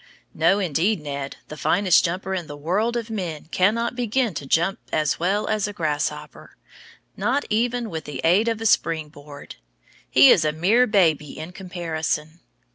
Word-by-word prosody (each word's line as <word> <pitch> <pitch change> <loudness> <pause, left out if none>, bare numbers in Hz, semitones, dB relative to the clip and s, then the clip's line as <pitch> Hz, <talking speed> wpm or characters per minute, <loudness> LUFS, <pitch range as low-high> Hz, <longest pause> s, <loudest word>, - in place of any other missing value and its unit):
No, 165 +5 +3
indeed, 185 +2 0
Ned, 140 -2 -5
the 150 - -7
finest 185 +3 +3
jumper 185 +2 -2
in 175 -4 -3
the 145 - -8
world 205 +11 0
of 230 -1 -5
men 175 -8 -4
cannot 230 +6 +1
begin 245 -2 0
to 145 -2 -6
jump 175 +9 +1
as 155 -2 0
well 195 +5 0
as 215 -1 0
a 205 - -6
grasshopper, 150 -3 -4 0.6
not 250 +9 0
even 240 +2 0
with 160 -6 -6
the 150 - -7
aid 185 +7 +3
of 225 -1 -1
a - - -4
spring 160 -7 +1
board. 145 - -12 0.5
He 270 - +7
is 165 - +4
a 155 - +1
mere 200 +11 +3
baby 160 -8 +1
in 160 +3 -7
comparison. 165 -3 -4
180 Hz, 170 wpm, -23 LUFS, 155-215 Hz, 0.6 s, He